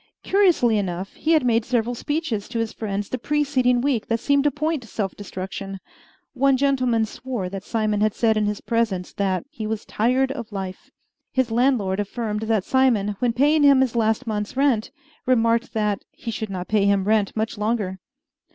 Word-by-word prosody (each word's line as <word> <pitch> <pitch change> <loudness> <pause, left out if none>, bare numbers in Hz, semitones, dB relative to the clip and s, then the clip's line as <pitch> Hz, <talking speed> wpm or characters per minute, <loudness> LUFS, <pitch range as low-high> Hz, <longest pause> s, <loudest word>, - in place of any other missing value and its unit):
Curiously 345 - +3
enough, 185 0 -4
he 325 - 0
had 310 -5 +3
made 230 -1 +3
several 240 0 0
speeches 255 -5 -3
to 240 - -4
his 225 -1 -2
friends 205 -2 -3
the 255 - -4
preceding 260 -3 +1
week 255 -5 0
that 230 0 0
seemed 280 +3 +2
to - - +5
point 305 0 -2
to 230 - -13
self 200 -3 -3
destruction. 195 0 -6 0.6
One 270 0 +3
gentleman 255 -4 +2
swore 225 -4 -5
that 195 0 -6
Simon 215 -2 0
had 215 -1 +2
said 225 -2 +2
in 210 -1 +1
his 210 -1 -3
presence 220 -6 -1
that 195 +2 -1
"he 220 -8 -5
was 220 0 -3
tired 255 +4 +1
of 240 -5 -6
life." 190 -2 -6 0.4
His 260 -3 0
landlord 225 -6 +2
affirmed 210 +1 -3
that 220 -4 +2
Simon, 230 -6 +2
when 245 -2 +1
paying 295 +5 +3
him 280 -2 +6
his 255 -3 0
last 225 +2 +1
month's 210 +1 -3
rent, 270 -6 +2 0.4
remarked 230 0 +2
that 210 -3 0
"he 230 - -7
should 220 -1 -4
not 185 -2 -5
pay 210 -2 +2
him 200 -1 +3
rent 210 0 +1
much 220 +1 -1
longer." 210 -4 -1
225 Hz, 190 wpm, -23 LUFS, 205-260 Hz, 0.6 s, him